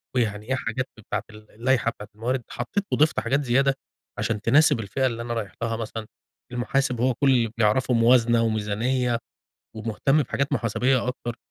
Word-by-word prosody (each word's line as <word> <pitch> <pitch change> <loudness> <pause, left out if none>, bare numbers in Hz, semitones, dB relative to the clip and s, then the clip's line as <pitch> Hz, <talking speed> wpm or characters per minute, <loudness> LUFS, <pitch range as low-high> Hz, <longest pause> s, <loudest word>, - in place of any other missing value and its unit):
ويعني 105 -4 0
إيه 130 - +2
حاجات 130 +1 -2
بتاعة 110 - -4
ال 105 0 -15
اللايحة 120 0 +1
بتاعة 105 - -11
الموارد، 120 +3 -2
حطيت 200 -1 -3
وضِفت 155 +2 +3
حاجات 140 +5 0
زيادة، 135 +2 +3 0.4
عشان 110 -3 -1
تناسب 145 +2 +4
الفئة 115 +6 -1
اللي 115 -2 -1
أنا 120 0 -3
رايح 110 -4 -4
لها 115 -1 0
مثلًا، 110 -1 -5 0.5
المحاسب 125 0 0
هو 130 +1 +3
كلّ 135 +4 +2
اللي 115 -4 +2
بيعرفه 120 +3 +2
موازنة 115 0 +4
وميزانية 115 +3 0 0.6
ومهتّم 115 +7 +1
بحاجات 140 +3 -2
محاسبية 125 +1 +1
أكتر، 120 -2 -4
120 Hz, 160 wpm, -25 LUFS, 110-130 Hz, 0.6 s, تناسب